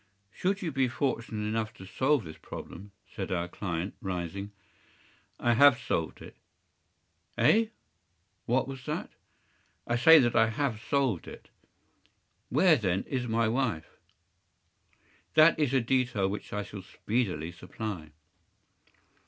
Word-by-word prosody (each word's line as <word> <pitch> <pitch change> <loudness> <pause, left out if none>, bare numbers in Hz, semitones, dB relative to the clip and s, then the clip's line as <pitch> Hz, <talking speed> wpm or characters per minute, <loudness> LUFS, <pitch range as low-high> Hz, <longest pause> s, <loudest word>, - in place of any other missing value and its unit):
” - - -43
“Should 195 - -1
you 165 - -2
be 135 -2 +1
fortunate 115 -4 -2
enough 110 0 -2
to 95 - -11
solve 130 +7 +1
this 80 -2 -10
problem,” 100 +3 -9 0.2
said 100 -4 -6
our 85 -1 -1
client, 90 0 -4
rising. 95 +2 -4 0.9
“I 120 - +2
have 140 0 +6
solved 80 - -3
it.” - - -13 1.0
“Eh? 215 - +4 0.8
What 130 +3 +2
was 135 -2 -8
that?” 150 - -3 0.7
“I 120 - 0
say 160 +7 +8
that 120 -5 +3
I 115 -1 +5
have 110 -1 -2
solved 125 - 0
it.” - - -11 1.0
“Where, 155 +5 +5
then, 95 -4 0
is 125 -2 -3
my 115 0 +1
wife?” 115 -9 -2 1.4
“That 155 +1 +6
is 145 -5 +2
a 135 - +3
detail 120 -4 +1
which 100 +2 -5
I 105 0 -2
shall 100 -1 -9
speedily 95 -5 -2
supply. 90 -1 -6
115 Hz, 135 wpm, -29 LUFS, 95-130 Hz, 1.4 s, say